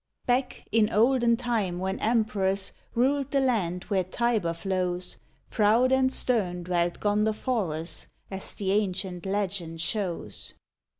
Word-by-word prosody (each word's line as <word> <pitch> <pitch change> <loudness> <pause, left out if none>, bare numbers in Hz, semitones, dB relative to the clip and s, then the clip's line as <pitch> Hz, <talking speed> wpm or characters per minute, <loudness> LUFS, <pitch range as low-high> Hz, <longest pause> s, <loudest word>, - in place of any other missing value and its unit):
Back, 250 +1 0
in 220 -1 +4
olden 235 +1 +4
time 225 -8 -1
when 190 +2 -2
emperors 205 -4 +1 0.2
Ruled 270 +3 +2
the 280 - +2
land 195 -10 0
where 195 -3 0
Tiber 215 -1 0
flows, 180 0 -2 0.3
Proud 225 +4 +4
and 265 0 +3
stern 190 -10 +2
dwelt 175 -1 0
Gondoforus, 210 -5 -1 0.2
As 190 0 -4
the 195 -2 -1
ancient 190 -3 -1
legend 190 -4 -2
shows. 185 -1 -3
205 Hz, 120 wpm, -27 LUFS, 180-235 Hz, 0.3 s, in